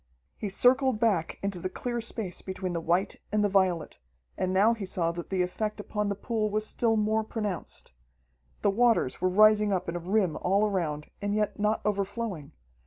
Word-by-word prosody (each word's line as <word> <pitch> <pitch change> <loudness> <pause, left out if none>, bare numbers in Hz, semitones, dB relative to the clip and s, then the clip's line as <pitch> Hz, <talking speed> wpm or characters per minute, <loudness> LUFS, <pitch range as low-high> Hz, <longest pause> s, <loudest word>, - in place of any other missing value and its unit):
He 210 - -4
circled 255 +3 +3
back 200 -8 +1
into 195 -2 -2
the 185 - -3
clear 240 +4 -3
space 220 -5 -5
between 185 -1 -4
the 170 - -2
white 175 +4 0
and 210 0 +2
the 205 - +2
violet, 185 -5 +1 0.4
and 185 - -1
now 200 +5 +4
he 225 -3 -6
saw 175 -3 -1
that 170 0 -7
the 185 -2 +1
effect 210 +4 -3
upon 210 0 -2
the 200 - -1
pool 215 +1 -1
was 215 +1 -1
still 225 0 +1
more 215 +1 +1
pronounced. 210 - -5 0.7
The 200 - +4
waters 230 - +2
were 185 - +3
rising 210 +2 +5
up 185 -2 -1
in 170 - -3
a - - -2
rim 185 0 +1
all 200 +3 +2
around, 160 -7 -2
and 205 0 -1
yet 210 0 -1
not 210 +1 +1
overflowing. 200 -5 -2
205 Hz, 190 wpm, -28 LUFS, 185-215 Hz, 0.7 s, rising